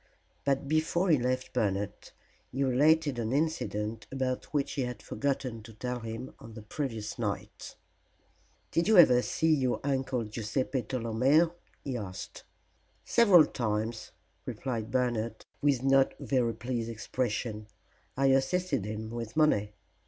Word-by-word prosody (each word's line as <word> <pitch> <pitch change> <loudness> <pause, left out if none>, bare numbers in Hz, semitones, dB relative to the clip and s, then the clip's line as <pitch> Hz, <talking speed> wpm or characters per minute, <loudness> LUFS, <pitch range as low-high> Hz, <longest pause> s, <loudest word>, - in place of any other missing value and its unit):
But 140 0 +1
before 160 +4 +2
he 150 - +5
left 130 +1 -1
Bernard 100 -4 0 0.6
he 135 +2 -1
related 145 +1 +3
an 115 -1 -2
incident 115 -8 -1
about 130 -1 -2
which 145 -2 0
he 140 - -2
had 125 -3 -3
forgotten 130 0 -2
to 110 +1 -12
tell 125 +3 -4
him 115 +2 -6
on 115 -1 -11
the 110 - -9
previous 110 -3 -4
night. - - -4 1.0
"Did 165 +2 +1
you 220 -2 +5
ever 125 -8 +8
see 160 +5 +1
your 130 -4 +1
Uncle 135 -3 0
Guiseppe 115 +5 -2
Tolomeo?" 130 +8 +2 0.3
he 130 -3 -3
asked. 95 -4 -7 0.6
"Several 200 -9 +6
times," 110 -3 -2 0.4
replied 115 -4 -3
Bernard, 115 -3 -1 0.2
with 140 -3 +2
no 135 0 +5
very 120 -4 0
pleased 115 0 -3
expression. 110 -1 -3 0.5
"I 135 - +2
assisted 135 - +1
him 110 +1 -5
with 115 +2 -6
money." 105 -10 +3
125 Hz, 135 wpm, -30 LUFS, 110-140 Hz, 1.0 s, ever